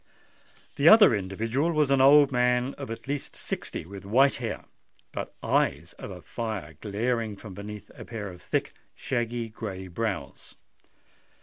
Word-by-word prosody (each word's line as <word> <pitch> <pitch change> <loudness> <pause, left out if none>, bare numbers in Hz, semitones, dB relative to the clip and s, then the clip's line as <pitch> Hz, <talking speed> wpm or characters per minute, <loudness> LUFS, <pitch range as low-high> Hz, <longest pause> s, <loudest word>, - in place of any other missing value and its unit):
The 145 +4 +7
other 215 - +8
individual 110 - -1
was 150 -3 +2
an 135 -1 +4
old 140 +1 +7
man, 125 +1 +2
of 140 -4 -8
at 115 +3 -7
least 140 0 -4
sixty, - - -5
with 100 +2 -9
white 130 +8 +4
hair, - - -4 0.5
but - - -6
eyes - - +1
of - - -8
fire 105 -9 -4
glaring 110 +1 -1
from 100 -1 -10
beneath 105 +2 -8
a - - -10
pair 110 -4 -6
of 90 -1 -12
thick, - - -2 0.2
shaggy 120 -2 -2
grey 100 -4 -6
brows. 105 +2 -4
115 Hz, 145 wpm, -27 LUFS, 100-135 Hz, 0.5 s, other